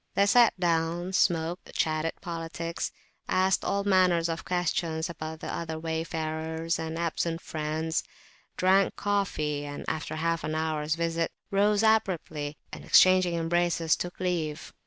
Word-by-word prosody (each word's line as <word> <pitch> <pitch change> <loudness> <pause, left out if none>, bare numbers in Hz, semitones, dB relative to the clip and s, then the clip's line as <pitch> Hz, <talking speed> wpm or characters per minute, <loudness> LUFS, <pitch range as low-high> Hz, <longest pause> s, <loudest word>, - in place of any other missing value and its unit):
They 200 - +4
sat 230 -1 +5
down, 170 +1 0
smoked, 170 -1 0
chatted 155 +1 0
politics, 165 -1 -4 0.4
asked 190 +1 +2
all 200 0 0
manner 185 -3 +4
of 165 0 -3
questions 170 -2 -1
about 155 0 -7
the - - -4
other 160 -1 -4
wayfarers 160 0 -2
and 160 0 -4
absent 170 0 -1
friends; 160 0 -2 0.6
drank 190 +1 +3
coffee; 165 -8 -1
and, 145 0 -6
after 155 - -3
half 165 +1 -1
an 155 - -2
hour's 155 -1 -1
visit, 165 0 -1 0.2
rose 205 +2 +3
abruptly, 170 -9 +1 0.2
and, - - -7
exchanging 185 -2 +5
embraces, 170 -1 +1
took 175 0 -6
leave. 170 -4 -2
165 Hz, 135 wpm, -28 LUFS, 160-180 Hz, 0.6 s, sat